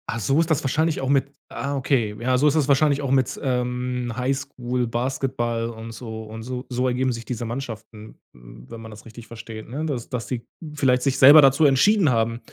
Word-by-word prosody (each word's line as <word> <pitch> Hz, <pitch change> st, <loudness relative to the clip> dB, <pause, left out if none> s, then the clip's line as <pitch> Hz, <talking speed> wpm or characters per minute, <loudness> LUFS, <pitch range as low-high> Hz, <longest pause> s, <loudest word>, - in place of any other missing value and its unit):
Ah, 115 Hz, -, -2 dB
so 135 Hz, +9 st, +1 dB
ist 165 Hz, 0 st, +1 dB
das 160 Hz, -, +1 dB
wahrscheinlich 155 Hz, +4 st, 0 dB
auch 135 Hz, -, -2 dB
mit 140 Hz, 0 st, +1 dB, 0.2 s
ah, 140 Hz, 0 st, -4 dB
okay. 125 Hz, -6 st, 0 dB
Ja, 125 Hz, +2 st, +1 dB
so 145 Hz, +4 st, +3 dB
ist 150 Hz, -, +2 dB
das 150 Hz, -4 st, +2 dB
wahrscheinlich 145 Hz, 0 st, +3 dB
auch 140 Hz, -2 st, -2 dB
mit, 130 Hz, -2 st, +1 dB
ähm, 125 Hz, -1 st, -2 dB
Highschool 125 Hz, -1 st, -2 dB
Basketball 120 Hz, -1 st, -2 dB
und 115 Hz, 0 st, -8 dB
so 110 Hz, -1 st, -7 dB
und 110 Hz, +1 st, -9 dB
so 125 Hz, +1 st, -6 dB
so 125 Hz, 0 st, -1 dB
ergeben 130 Hz, +1 st, 0 dB
sich 115 Hz, -1 st, -6 dB
diese 120 Hz, -1 st, -4 dB
Mannschaften, 110 Hz, -3 st, -8 dB
hm, -, -, -15 dB
wenn 115 Hz, -, -9 dB
man 110 Hz, 0 st, -10 dB
das 105 Hz, 0 st, -13 dB
richtig 115 Hz, 0 st, -12 dB
versteht, 115 Hz, -1 st, -9 dB
ne? 145 Hz, +6 st, -4 dB
Dass 130 Hz, -7 st, -4 dB
dass 120 Hz, -2 st, -4 dB
die 120 Hz, -3 st, -4 dB, 0.3 s
vielleicht 130 Hz, -4 st, +1 dB
sich 135 Hz, -1 st, 0 dB
selber 145 Hz, +3 st, +9 dB
dazu 135 Hz, +3 st, +4 dB
entschieden 160 Hz, +6 st, +4 dB
haben, 115 Hz, -1 st, 0 dB
125 Hz, 210 wpm, -23 LUFS, 115-135 Hz, 0.3 s, selber